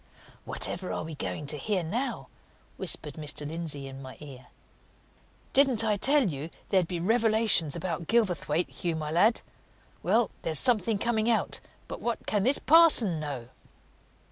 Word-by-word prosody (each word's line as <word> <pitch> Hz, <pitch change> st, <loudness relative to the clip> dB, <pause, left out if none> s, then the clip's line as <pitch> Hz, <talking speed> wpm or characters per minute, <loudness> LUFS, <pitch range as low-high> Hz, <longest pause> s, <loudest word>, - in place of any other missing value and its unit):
"Whatever 180 Hz, +1 st, -4 dB
are -, -, -4 dB
we 160 Hz, 0 st, -8 dB
going 150 Hz, 0 st, -5 dB
to 145 Hz, +1 st, -1 dB
hear 195 Hz, +2 st, -2 dB
now?" 235 Hz, +12 st, -4 dB, 0.5 s
whispered 155 Hz, -5 st, 0 dB
Mr. 150 Hz, 0 st, -4 dB
Lindsey 155 Hz, -3 st, -5 dB
in 135 Hz, 0 st, -10 dB
my 130 Hz, -1 st, -11 dB
ear. 135 Hz, -4 st, -12 dB, 1.1 s
"Didn't 265 Hz, -5 st, +5 dB
I 215 Hz, -2 st, +1 dB
tell 270 Hz, +4 st, +3 dB
you 150 Hz, -1 st, -5 dB, 0.2 s
there'd 185 Hz, -3 st, +1 dB
be 175 Hz, -1 st, -4 dB
revelations 220 Hz, -, +2 dB
about 170 Hz, -1 st, -5 dB
Gilverthwaite, 180 Hz, -7 st, 0 dB
Hugh, 170 Hz, -2 st, -3 dB
my 155 Hz, -1 st, -5 dB
lad? 205 Hz, +8 st, +2 dB, 0.6 s
Well, 230 Hz, -2 st, +1 dB
there's 160 Hz, -2 st, +3 dB
something 225 Hz, -, +4 dB
coming 220 Hz, +1 st, -1 dB
out! 225 Hz, -, 0 dB, 0.3 s
But -, -, -8 dB
what 235 Hz, -2 st, -4 dB
can 205 Hz, -, 0 dB
this 260 Hz, +7 st, +3 dB
parson 290 Hz, -, +5 dB
know?" 135 Hz, -6 st, -6 dB
180 Hz, 150 wpm, -27 LUFS, 155-225 Hz, 1.1 s, Didn't